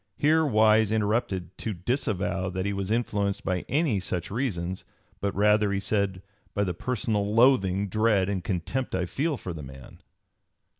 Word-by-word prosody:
Here 160 +2 +3
Wise 110 -5 +4
interrupted 105 -5 -1
to 110 - -2
disavow 95 -2 -1
that 95 +1 -3
he 100 - -1
was 100 -1 -3
influenced 105 -3 -1
by 90 -2 -1
any 145 -8 +1
such 90 -1 -3
reasons, 95 -7 -2 0.4
but 100 -1 -2
rather, 105 0 +3
he 100 - 0
said, 100 -2 -1 0.3
by 100 - +2
the 90 -3 -1
"personal 105 0 -1
loathing, 100 -6 +4
dread, 105 -1 +2
and 100 -3 -2
contempt 100 +9 -2
I 90 -1 0
feel 140 - -1
for 90 -5 -6
the 80 - -7
man." 65 -1 -12
100 Hz, 160 wpm, -27 LUFS, 95-110 Hz, 0.4 s, Wise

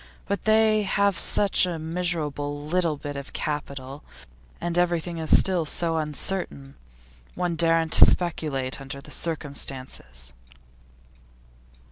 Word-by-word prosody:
But 200 -2 -2
they 215 0 +4
have 200 -1 +1
such 195 +2 +2
a 175 -2 -3
miserable 155 -4 -2
little 165 -1 0
bit 145 0 -6
of 140 0 -7
capital, 140 -2 -4 0.6
and 170 -1 -3
everything 175 -1 0
is 160 - +5
still 185 -3 +2
so 165 +2 +1
uncertain. 150 -2 -3 0.6
One 180 -2 -1
daren't 165 -1 +2
speculate 145 -7 +3
under 135 +1 -6
the - - -13
circumstances. 135 - -4
160 Hz, 110 wpm, -25 LUFS, 145-175 Hz, 0.6 s, is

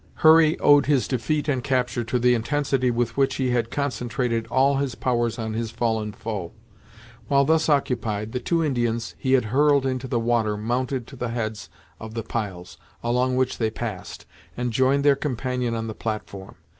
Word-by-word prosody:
Hurry 160 +1 +7
owed 145 -1 +5
his 140 -4 +2
defeat 145 +4 -1
and 130 -4 0
capture 125 -3 0
to 115 +3 0
the 125 0 +3
intensity 135 +1 0
with 120 -1 -1
which 135 -1 +2
he 130 -2 0
had 120 -2 0
concentrated 120 -3 -2
all 135 +3 +3
his 135 -4 -2
powers 120 -2 0
on 110 -2 -4
his 115 0 -2
fallen 110 -2 -1
foe. 105 -5 -5 0.7
While 140 -1 +3
thus 160 +2 +2
occupied, 115 -7 0
the 125 - -2
two 165 +6 0
Indians 120 -4 -1
he 130 -1 0
had 130 -3 +4
hurled 145 -1 +4
into 130 0 -2
the 120 -1 0
water 115 -2 +1
mounted 125 +3 -2
to 135 - -12
the 125 -2 -3
heads 110 -6 -4 0.3
of 110 0 -9
the 115 - -3
piles, 95 -7 -5 0.2
along 125 +2 +1
which 130 0 0
they 110 -2 +1
passed, 110 -4 -6 0.3
and 120 -1 -2
joined 130 +3 +2
their 145 -1 +5
companion 125 -3 -2
on 115 0 -3
the 110 - -5
platform. 105 -3 -6
125 Hz, 180 wpm, -24 LUFS, 115-135 Hz, 0.7 s, Hurry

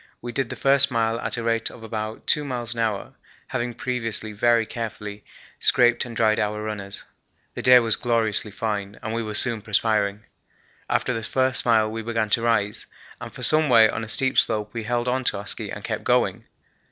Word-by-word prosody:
We 120 - -6
did 125 0 -2
the 130 - -5
first 135 +4 +4
mile 115 -2 0
at - - -3
a 115 - -3
rate 115 0 0
of 115 - -13
about 110 0 -5
2 150 - +2
miles 120 -4 -4
an 115 - -7
hour, 110 -3 -2 0.4
having 120 -2 -3
previously 115 -4 -3
very 115 +2 +3
carefully 105 -3 -6 0.4
scraped 120 -1 +3
and 120 -2 -8
dried 110 -1 +3
our 105 0 -1
runners. 100 -2 -5 0.5
The - - -5
day 125 0 +8
was 115 -2 +3
gloriously 115 -3 0
fine 105 -2 -4
and 110 - -3
we 115 - -1
were 110 -2 -5
soon 115 -1 +3
perspiring. 105 -1 0 0.7
After - - +1
the 115 - -3
first 130 +2 0
mile 110 -2 +3
we 115 0 -4
began 110 -2 -2
to 115 - +3
rise, 110 -3 0 0.3
and - - -7
for - - -8
some 155 -1 +4
way 115 -3 +7
on 110 - -3
a 110 - -7
steep 130 +4 +2
slope 105 -1 0
we 115 -2 -4
held 120 +1 -1 0.2
to - - +1
our 100 - -7
ski - - -4
and - - -7
kept - - -3
going. - - +1
115 Hz, 200 wpm, -24 LUFS, 110-120 Hz, 0.7 s, day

